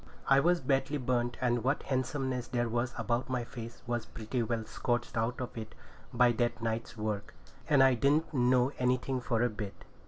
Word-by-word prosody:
I 135 0 +6
was 175 +4 +3
badly 135 +2 +1
burnt, 120 -2 0
and 120 -2 +1
what 135 +4 +1
handsomeness 130 -1 -1
there 120 -1 0
was 120 +2 -1
about 120 +2 -1
my 125 -2 -1
face 115 -1 -9
was 120 -2 -2
pretty 110 +3 -3
well 115 -1 -1
scorched 120 +2 -2
out 115 +2 0
of 125 -1 -5
it 110 -1 -7 0.4
by 125 -1 +5
that 120 +1 0
night's 115 +1 -3
work; 105 -2 -3 0.3
and 140 -3 +6
I 135 -1 +6
didn't 145 +7 +2
know 125 0 +3
anything 125 +1 +1
for 120 -1 +1
a 120 - +3
bit. 105 -2 -7
120 Hz, 185 wpm, -31 LUFS, 115-130 Hz, 0.4 s, I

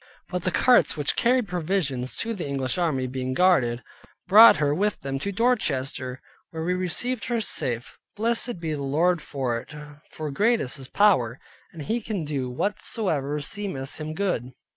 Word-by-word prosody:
But 180 -2 -3
the - - +3
carts 245 -2 +4
which 145 -2 0
carried 245 -1 +2
provision 175 -7 -1
to 230 - -2
the 180 -8 -5
English 135 +2 -2
army, 150 -7 0
being 130 0 -3
guarded, 130 -10 +3 0.4
brought 220 +5 +9
her 145 -1 +1
with 205 +6 0
them 135 0 -3
to 200 +8 -3
Dorchester, 135 - -1 0.3
where 160 -1 -5
we 180 +2 0
received 185 +7 -2
her 240 -1 0
safe. 125 - -3 0.2
Blessed 230 -1 0
be 160 -2 -3
the 145 - -4
Lord 160 +5 +1
for 130 -6 -2
it, 150 - -12 0.3
for 155 -2 -5
great 225 +10 +2
is 130 +2 -4
His 135 -1 -9
power, 130 - +3 0.3
and 160 -3 -8
He 230 +8 -1
can 205 -6 -3
do 135 -4 -3
whatsoever 150 - -1
seemeth 155 -5 -4
Him 155 0 -5
good. 170 - -2
160 Hz, 170 wpm, -25 LUFS, 135-200 Hz, 0.4 s, brought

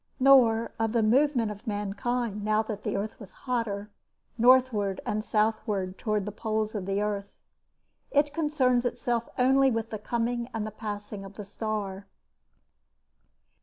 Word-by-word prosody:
Nor 245 -4 +5
of 225 0 0
the 230 -2 +3
movement 245 -1 +3
of 210 +4 -11
mankind 210 +1 -2
now 215 +1 +2
that 215 -2 -5
the - - -2
earth 210 +2 -4
was 205 -5 -11
hotter, 215 -5 -2 0.4
northward 240 -5 +4
and 215 0 -1
southward 210 -4 0
towards 215 -3 -1
the 210 - -4
poles 215 0 -2
of 200 -4 -4
the 195 +1 0
earth. 200 -1 -2 0.8
It 290 0 +2
concerns 285 -6 +2
itself 240 -1 -1
only 265 +2 +4
with 225 -2 -2
the 215 - -4
coming 235 +2 -2
and 215 -1 -2
the 215 - -5
passing 210 -1 -6
of 195 0 -11
the 210 - -7
Star. 200 -2 -4
220 Hz, 150 wpm, -28 LUFS, 205-245 Hz, 0.8 s, Nor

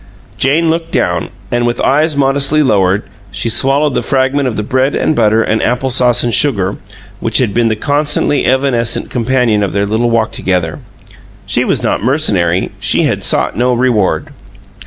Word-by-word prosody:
Jane 155 +5 +1
looked 165 0 -3
down, - - -1 0.2
and 120 0 0
with 120 - -2
eyes 150 +2 +1
modestly 140 +2 +2
lowered 100 -5 +1 0.3
she 105 +3 -4
swallowed 135 +5 +1
the - - 0
last - - -7
fragment 135 +1 +1
of 120 - -3
the 105 - -2
bread 130 +5 0
and 155 - 0
butter 110 -1 +2
and 110 - -1
apple 125 +2 -1
sauce 120 -1 +2
and 120 -1 -1
sugar 100 -9 0 0.4
which 115 -1 -1
had 120 -6 0
been 120 -1 +1
the 110 - 0
constantly 145 +3 +1
evanescent 125 -3 +1
companion 120 -3 +1
of 100 - -2
their 100 +1 0
little 110 +3 0
walk 115 -1 0
together. 90 -4 -2 0.7
She - - 0
was - - -1
not - - 0
mercenary; 100 - 0
she - - +1
had - - -1
sought - - +1
no 125 +1 +1
reward. 120 -5 0
120 Hz, 180 wpm, -13 LUFS, 110-135 Hz, 0.7 s, modestly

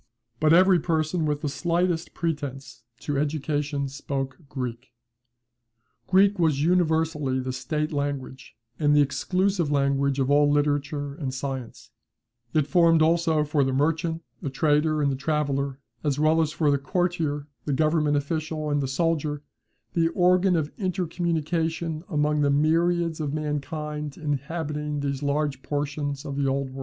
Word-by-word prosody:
But 155 0 +3
every 185 +1 +6
person 160 0 0
with 145 -1 -1
the - - -2
slightest 170 +3 -1
pretence 140 -7 -4 0.2
to 145 -2 -1
education 145 -1 -1
spoke 135 -1 -4
Greek. 125 -1 -5 1.2
Greek 195 +1 +4
was 155 -4 +2
universally 160 -5 +1
the 130 0 -3
State 150 +4 -2
language, 140 -4 -4 0.2
and 145 -1 +3
the 145 - +6
exclusive 180 +5 0
language 140 -1 +1
of 135 0 +1
all 145 0 +5
literature 145 0 0
and 140 -3 -4
science, 130 -2 -6 0.6
It 155 -3 +2
formed 165 -1 +4
also 165 -1 +2
for 150 -1 +1
the 135 0 0
merchant, 160 +4 0 0.2
the 140 - -3
trader, 150 +2 +2
and 140 - +2
the - - -1
traveller, 140 -1 -1 0.3
as 145 -3 0
well 155 +2 +3
as 155 -1 0
for 155 -2 +1
the 140 - +2
courtier, 160 -2 -1 0.2
the 150 - -1
government 155 0 +2
official, 155 +1 -2
and 145 0 +1
the 135 - -1
soldier, 150 0 -1 0.5
the 165 -1 +3
organ 180 +2 +3
of 155 -2 -1
intercommunication 165 -3 -1
among 150 -2 +1
the 145 - +3
myriads 165 +3 +2
of 150 -1 -2
mankind 150 0 -4
inhabiting 150 0 -3
these 140 -1 -2
large 145 -1 -1
portions 145 -1 -3
of 140 -1 -4
the 140 -1 +1
Old 135 0 -1
World. 135 - -8
150 Hz, 150 wpm, -25 LUFS, 140-160 Hz, 1.2 s, every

